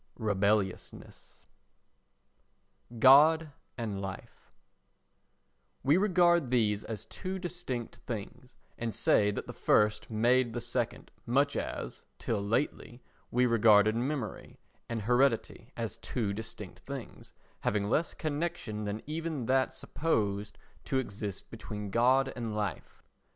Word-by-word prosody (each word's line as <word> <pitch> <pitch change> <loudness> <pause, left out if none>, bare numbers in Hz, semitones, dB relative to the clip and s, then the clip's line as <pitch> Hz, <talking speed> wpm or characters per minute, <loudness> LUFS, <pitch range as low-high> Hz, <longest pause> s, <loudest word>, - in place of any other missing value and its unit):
XXI 110 - -6
Rebelliousness 100 -1 -1 1.5
God 150 +6 +7 0.3
and 105 -5 -3
Life 95 -1 -8 1.3
WE 140 +4 +4
regard 175 -6 +3
these 110 -4 +2
as 110 -4 -6
two 185 +1 -5
distinct 175 -10 -5
things 120 +3 -7 0.2
and 115 -2 -3
say 105 - +3
that 105 - -3
the - - -8
first 105 0 +2
made 120 +2 +2
the 120 - -2
second, 120 0 -2 0.2
much 140 +4 +2
as, - - -4
till 110 -3 -2
lately, 120 +3 -2 0.3
we 125 +1 +3
regarded 110 -2 +5
memory 125 -2 -3 0.3
and 115 -2 -3
heredity 125 0 +1
as 115 -1 -3
two 115 -2 -2
distinct 105 -4 -7
things 135 +2 -9 0.2
having 100 -1 0
less 155 +9 0
connection 150 -9 -3
than 105 +1 -4
even 155 -4 -3
that 130 +2 +2
supposed 105 -9 -2 0.3
to 135 - 0
exist 105 -5 -4
between 105 -2 -6
God 130 +4 +3
and 115 -3 -4
life. 105 -3 -4
115 Hz, 120 wpm, -30 LUFS, 105-135 Hz, 1.5 s, God